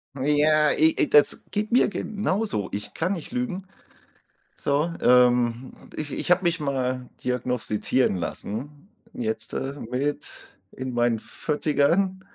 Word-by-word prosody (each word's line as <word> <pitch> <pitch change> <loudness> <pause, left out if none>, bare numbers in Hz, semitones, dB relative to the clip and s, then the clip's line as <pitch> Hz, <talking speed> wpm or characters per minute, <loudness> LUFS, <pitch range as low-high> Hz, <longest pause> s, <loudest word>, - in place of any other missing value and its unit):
Ja, 150 +2 +3
i 160 +1 +4
i - - +2
das 145 - +5
geht 215 +2 -2
mir 250 - +5
genauso. 205 - -2
Ich 105 +1 -5
kann 180 +4 -1
nicht 170 0 -7
lügen. 235 -7 -3 0.9
So, 150 +4 0
ähm, 125 0 +3 0.2
ich 150 -2 -5
ich - - -2
habe 180 +1 +5
mich 170 -1 +1
mal 130 -3 -2 0.2
diagnostizieren 125 -2 0
lassen 135 - -5 0.2
jetzt, 110 -2 -3
äh, 135 +1 -3
mit 135 +5 -4 0.2
in 130 -1 -6
meinen 120 -1 +1
40ern. 165 - 0
145 Hz, 125 wpm, -25 LUFS, 125-170 Hz, 0.9 s, das